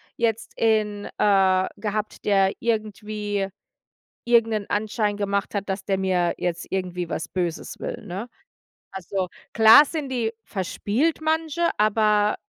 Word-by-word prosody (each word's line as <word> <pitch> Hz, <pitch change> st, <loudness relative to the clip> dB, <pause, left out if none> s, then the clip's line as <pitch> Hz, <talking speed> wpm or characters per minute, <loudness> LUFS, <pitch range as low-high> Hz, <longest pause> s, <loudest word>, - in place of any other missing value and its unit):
jetzt 230 Hz, -1 st, -1 dB
in 210 Hz, -2 st, +1 dB
äh, 190 Hz, -2 st, +4 dB
gehabt, 215 Hz, 0 st, -4 dB
der 195 Hz, -2 st, +3 dB
irgendwie 210 Hz, -3 st, -2 dB, 0.8 s
irgend 235 Hz, -1 st, +4 dB
'nen 210 Hz, -2 st, -2 dB
Anschein 210 Hz, 0 st, 0 dB
gemacht 200 Hz, 0 st, -2 dB
hat, 200 Hz, 0 st, -3 dB
dass 190 Hz, 0 st, -3 dB
der 195 Hz, -1 st, 0 dB
mir 185 Hz, -2 st, +1 dB
jetzt 175 Hz, -1 st, -3 dB
irgendwie 180 Hz, -2 st, -3 dB
was -, -, -3 dB
Böses 175 Hz, -3 st, -3 dB
will, -, -, -5 dB
ne? 195 Hz, +7 st, -5 dB, 0.7 s
Also, 190 Hz, 0 st, -3 dB, 0.2 s
klar 225 Hz, +6 st, +8 dB
sind 300 Hz, -4 st, -4 dB
die 230 Hz, -3 st, -1 dB
verspielt 220 Hz, -, -1 dB
manche, 320 Hz, +1 st, 0 dB
aber 210 Hz, 0 st, +3 dB
210 Hz, 130 wpm, -24 LUFS, 190-225 Hz, 0.8 s, klar